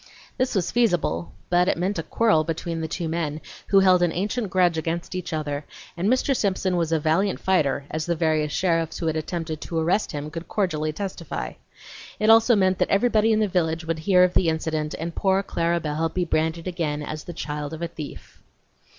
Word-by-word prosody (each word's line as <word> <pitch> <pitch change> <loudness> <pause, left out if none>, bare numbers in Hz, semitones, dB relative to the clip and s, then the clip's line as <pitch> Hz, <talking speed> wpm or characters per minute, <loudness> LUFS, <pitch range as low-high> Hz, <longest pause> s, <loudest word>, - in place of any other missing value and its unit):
This 255 -2 -1
was 180 -3 0
feasible, 175 - +1 0.2
but 180 0 +4
it - - +1
meant 185 +4 -1
a - - +1
quarrel 220 -9 +2
between 165 +1 -3
the 160 - -2
two 165 +1 -3
men, 160 -2 -2 0.3
who 195 -1 +5
held 185 -2 +5
an 175 -2 +3
ancient 205 +5 -2
grudge 180 -2 +3
against 165 +3 -3
each 185 -1 -4
other, 150 -2 -3 0.3
and 180 +4 0
Mr. 260 +2 +2
Simpson 190 -4 0
was 165 -2 0
a 160 - +2
valiant 165 +6 +1
fighter 145 -7 +1
as 155 +1 -3
the 170 - +1
various 155 -2 +1
sheriffs 165 -2 0
who - - -4
had 160 -1 0
attempted 160 -1 -4
to 165 - -4
arrest 175 +6 +1
him 150 +1 -5
could 165 +1 -7
cordially 155 -7 -1
testify. 160 - -5 0.7
It 215 +1 +5
also 225 +1 +6
meant 190 -2 +2
that - - +1
everybody 220 +1 +3
in 215 0 +3
the 215 - +2
village 165 -3 0
would 165 -1 -2
hear 180 +2 +4
of 180 0 +3
the 175 - +3
incident 160 -1 -2
and 165 +1 -4
poor 190 +2 +1
Clara 170 -2 0
Belle 155 +1 -1
be 180 +1 -1
branded 160 +1 -1
again 155 -5 -2
as 155 +1 -6
the - - -6
child 150 -2 -4
of 160 +1 -6
a - - 0
thief. 155 -3 -10
170 Hz, 210 wpm, -24 LUFS, 155-190 Hz, 0.7 s, also